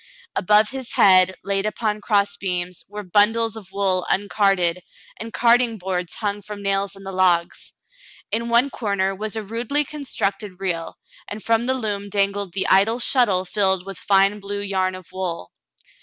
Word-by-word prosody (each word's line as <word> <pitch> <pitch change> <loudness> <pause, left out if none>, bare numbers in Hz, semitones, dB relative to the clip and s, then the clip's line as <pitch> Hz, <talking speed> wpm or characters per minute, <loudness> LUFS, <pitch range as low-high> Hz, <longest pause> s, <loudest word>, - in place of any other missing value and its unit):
Above 210 +2 +3
his 260 -2 -5
head, 185 -1 +5
laid 195 0 0
upon 215 0 -2
cross 200 -1 +1
beams, 180 -2 -3
were 210 0 -7
bundles 215 +4 +2
of 200 -4 -11
wool 190 -2 +1
uncarded, 195 -3 +1 0.4
and 225 +1 -6
carding 235 -1 +3
boards 180 -2 -3
hung 205 -1 -3
from 205 0 -9
nails 195 0 0
in 195 - -13
the 195 - -6
logs. 180 -2 +1 0.6
In 235 +1 -1
one 240 +4 +3
corner 200 -3 -1
was 210 +2 -4
a 220 - -3
rudely 235 +8 -1
constructed 210 -9 -3
reel, 175 -4 -3 0.3
and 205 +1 -7
from 230 +1 +1
the 260 - +1
loom 205 -5 -3
dangled 200 -2 -1
the 195 - -1
idle 200 +5 +4
shuttle 235 -7 +2
filled 190 -1 0
with 195 -1 -7
fine 195 +1 +3
blue 200 0 -5
yarn 190 -2 -1
of 185 -1 -10
wool. 175 - -4
200 Hz, 165 wpm, -22 LUFS, 190-220 Hz, 0.6 s, head